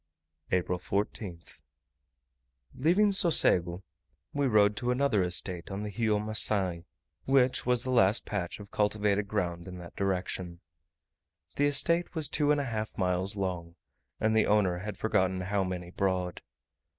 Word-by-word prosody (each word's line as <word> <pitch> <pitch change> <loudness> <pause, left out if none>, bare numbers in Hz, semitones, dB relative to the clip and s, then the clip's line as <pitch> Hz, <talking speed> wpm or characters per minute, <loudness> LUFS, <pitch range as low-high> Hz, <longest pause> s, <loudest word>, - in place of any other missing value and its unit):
April 90 0 0
14th. 100 -2 -5 1.1
Leaving 185 +9 +3
Socego, 95 - +3 0.5
we 145 -1 0
rode 105 -3 +3
to 125 -1 -2
another 125 -5 +2
estate 90 0 -2
on 100 +1 -5
the 105 - -5
Rio 110 -3 +1
Macae, 105 -5 +2 0.4
which 130 -2 +2
was 125 -1 +2
the 130 - -3
last 105 -3 +3
patch 95 -3 -4
of 100 -1 -12
cultivated 105 -1 0
ground 90 -5 -3
in 90 -1 -8
that 85 -1 -11
direction. 90 -2 -3 1.0
The 145 - +2
estate 170 +5 +2
was 155 -4 0
two 150 -1 0
and 150 0 +3
a 140 - -2
half 110 -3 -4
miles 95 +2 +1
long, 90 -4 -4 0.4
and 110 0 +1
the 110 - +3
owner 95 -4 +2
had 105 +3 -6
forgotten 95 -4 0
how 100 +1 -1
many 90 -1 -5
broad. 90 -2 -2
100 Hz, 145 wpm, -29 LUFS, 90-120 Hz, 1.1 s, Leaving